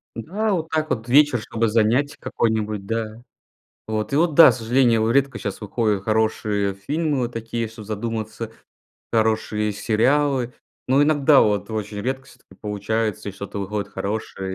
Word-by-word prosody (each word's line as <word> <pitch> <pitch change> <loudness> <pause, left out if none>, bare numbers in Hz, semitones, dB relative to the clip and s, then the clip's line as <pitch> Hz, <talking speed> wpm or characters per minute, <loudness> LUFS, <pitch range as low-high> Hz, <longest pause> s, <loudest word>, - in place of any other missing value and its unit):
Да, 205 - -2
вот 165 -2 -2
так 155 -1 -1
вот 115 0 -2
вечер, 140 -1 +5
чтобы 115 +1 -1
занятие 120 +7 +2
какое-нибудь, 110 -5 -1
да. 115 +1 -4 0.6
Вот 110 +3 -3
и - - +2
вот, 165 -1 +2
да, 165 - +9
к 120 - -1
сожалению, 120 +1 +2
его 110 - +1
редко 135 -2 +1
щас 100 - -5
выходят 105 -1 -1
хорошие 110 -2 0
фильмы, 145 +8 -1
вот 120 -1 -2
такие, 115 0 -3
чтоб 110 -1 -11
задуматься, 110 +1 -4 0.6
хорошие 110 -1 +1
сериалы. 125 +4 +1 0.4
Но 135 +2 +4
иногда, 145 -1 +5
вот 105 0 +1
очень 105 -1 -4
редко, 130 +4 -3
всё-таки 125 -7 -19
получается, 105 0 -2
и - - -5
что-то 100 +1 -7
выходит 100 +1 -4
хорошее. 100 -2 -4
115 Hz, 155 wpm, -22 LUFS, 105-130 Hz, 0.6 s, да